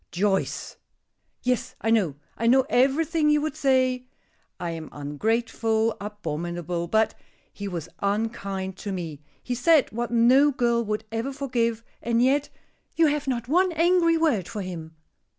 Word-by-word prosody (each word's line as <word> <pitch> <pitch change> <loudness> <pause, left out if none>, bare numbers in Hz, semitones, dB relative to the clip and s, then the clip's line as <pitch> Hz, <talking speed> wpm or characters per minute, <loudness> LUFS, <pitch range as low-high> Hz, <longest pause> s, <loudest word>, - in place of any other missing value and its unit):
"Joyce!" 195 +2 -1 0.7
"Yes, 250 -1 -1
I 225 - 0
know 190 -11 +2 0.2
I 230 - -1
know 260 +2 +5
everything 300 +5 +3
you 300 0 +4
would 310 +1 -2
say. 255 -2 +1 0.5
I 175 - -3
am 160 -2 -6
ungrateful, 220 +8 0
abominable, 175 -3 -4
but 220 +4 +2 0.4
He 205 - -6
was 170 -4 -4
unkind 200 -2 -2
to 205 - -5
me! 165 -6 -5 0.2
He 250 - -3
said 295 +4 +4
what 240 +2 -3
no 245 +5 +5
girl 240 -3 +1
would 215 0 -3
ever 230 +4 -2
forgive, 240 -5 -1 0.2
and 235 0 +1
yet 280 +3 +2 0.5
you 330 - +4
have 295 -1 0
not 245 -2 -2
one 360 +6 +3
angry 335 0 +3
word 280 - +1
for 215 -4 -5
him." 165 -3 -7
230 Hz, 150 wpm, -25 LUFS, 195-270 Hz, 0.7 s, know